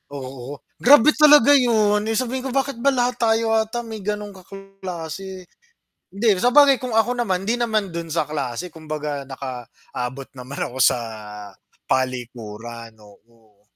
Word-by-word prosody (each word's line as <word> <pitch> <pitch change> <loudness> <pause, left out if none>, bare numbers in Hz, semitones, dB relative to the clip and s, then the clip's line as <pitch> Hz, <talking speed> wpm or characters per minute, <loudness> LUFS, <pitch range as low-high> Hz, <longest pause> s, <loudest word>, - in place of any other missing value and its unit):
Oo. 135 +1 -8 0.2
Grabe 285 +2 +7
talaga 295 -1 +7
'yun! 220 -6 +4
Eh, 225 - 0
sabihin 255 +2 -2
ko, - - -4
"Bakit 270 -3 -1
ba 280 +3 +3
lahat 245 0 0
tayo 225 -1 +2
ata 225 +2 0
may 220 -2 -7
gano'ng 210 +1 -4
kaklase?" 190 -1 -8 0.7
Hindi, 220 +4 -1
sabagay 275 +2 +6
kung 250 -3 -4
ako 240 +2 +3
naman 190 -7 0
hindi 235 +3 0
naman 220 -4 0
do'n 170 -1 -5
sa 155 -1 0
klase 145 +3 -4
kumbaga 150 -3 -5
nakaabot 130 0 -7
naman 130 +2 -7
ako 125 - -10
sa 125 - +4 0.9
palikuran, 120 -3 -4
oo. 105 0 -22
190 Hz, 140 wpm, -22 LUFS, -, 0.9 s, Grabe